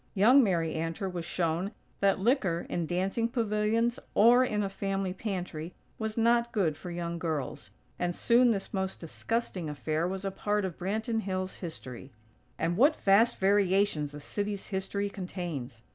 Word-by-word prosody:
Young 245 Hz, +8 st, +7 dB
Mary 170 Hz, -6 st, +1 dB
Antor 165 Hz, +4 st, -2 dB
was 170 Hz, -2 st, -4 dB
shown 175 Hz, +5 st, -1 dB, 0.3 s
that 195 Hz, -1 st, +3 dB
liquor, 195 Hz, -, +1 dB
in 170 Hz, -2 st, -1 dB
dancing 190 Hz, +6 st, 0 dB
pavilions 230 Hz, 0 st, +1 dB, 0.2 s
or 240 Hz, +4 st, +7 dB
in 210 Hz, -4 st, 0 dB
a -, -, 0 dB
family 195 Hz, -1 st, -2 dB
pantry 180 Hz, -5 st, -5 dB, 0.2 s
was 220 Hz, 0 st, -3 dB
not 235 Hz, +1 st, +3 dB
good 175 Hz, -8 st, +1 dB
for 180 Hz, -, -8 dB
young 170 Hz, -1 st, -4 dB
girls; 150 Hz, -, -3 dB, 0.3 s
and 175 Hz, -1 st, -1 dB
soon 245 Hz, +1 st, +4 dB
this 200 Hz, -4 st, -1 dB
most 190 Hz, -1 st, -2 dB
disgusting 180 Hz, 0 st, -3 dB
affair 155 Hz, +3 st, -1 dB
was 190 Hz, +1 st, -4 dB
a 195 Hz, -, -1 dB
part 205 Hz, +1 st, -1 dB
of 180 Hz, -4 st, -6 dB
Branton 220 Hz, +5 st, -1 dB
Hills' 185 Hz, -2 st, -3 dB
history. 135 Hz, -7 st, -8 dB, 0.5 s
And 170 Hz, +1 st, 0 dB
what 290 Hz, +7 st, +5 dB
vast 210 Hz, +5 st, +4 dB
variations 195 Hz, -6 st, +2 dB
a -, -, -7 dB
city's 205 Hz, +5 st, -3 dB
history 200 Hz, +1 st, -2 dB
contains! 170 Hz, -, -6 dB
195 Hz, 160 wpm, -29 LUFS, 170-215 Hz, 0.5 s, Young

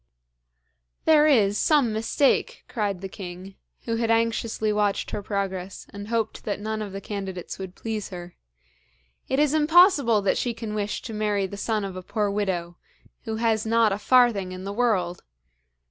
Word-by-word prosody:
'There 310 Hz, -1 st, +6 dB
is 210 Hz, -8 st, +3 dB
some 280 Hz, -8 st, +3 dB
mistake,' 225 Hz, +5 st, +1 dB
cried 210 Hz, -7 st, -2 dB
the 195 Hz, -, -4 dB
king, 185 Hz, 0 st, -9 dB, 0.3 s
who 230 Hz, -1 st, -1 dB
had 230 Hz, -1 st, 0 dB
anxiously 225 Hz, -1 st, +1 dB
watched 210 Hz, -1 st, 0 dB
her 210 Hz, -, -3 dB
progress, 195 Hz, -2 st, -4 dB
and 205 Hz, 0 st, -7 dB
hoped 225 Hz, -1 st, -2 dB
that 205 Hz, -, -3 dB
none 215 Hz, +1 st, -3 dB
of 205 Hz, -2 st, -5 dB
the 195 Hz, -, -5 dB
candidates 195 Hz, -4 st, -6 dB
would 190 Hz, -1 st, -7 dB
please 220 Hz, -2 st, -4 dB
her. 175 Hz, -1 st, -8 dB, 1.0 s
'It 265 Hz, -, +1 dB
is 295 Hz, 0 st, +3 dB
impossible 310 Hz, -, +5 dB
that 200 Hz, -1 st, +1 dB
she 240 Hz, -2 st, -1 dB
can 225 Hz, -2 st, -5 dB
wish 210 Hz, -1 st, -3 dB
to 225 Hz, -, -6 dB
marry 210 Hz, -2 st, 0 dB
the 190 Hz, -, -6 dB
son 210 Hz, 0 st, -1 dB
of 190 Hz, -2 st, -6 dB
a 185 Hz, -, -5 dB
poor 205 Hz, +2 st, -1 dB
widow, 180 Hz, -4 st, -2 dB, 0.5 s
who 220 Hz, -1 st, -3 dB
has 220 Hz, -1 st, +1 dB
not 225 Hz, -1 st, +3 dB
a 195 Hz, -, -2 dB
farthing 230 Hz, -5 st, +3 dB
in 185 Hz, 0 st, -7 dB
the 200 Hz, +1 st, -4 dB
world! 200 Hz, -7 st, 0 dB
210 Hz, 175 wpm, -25 LUFS, 195-230 Hz, 1.0 s, There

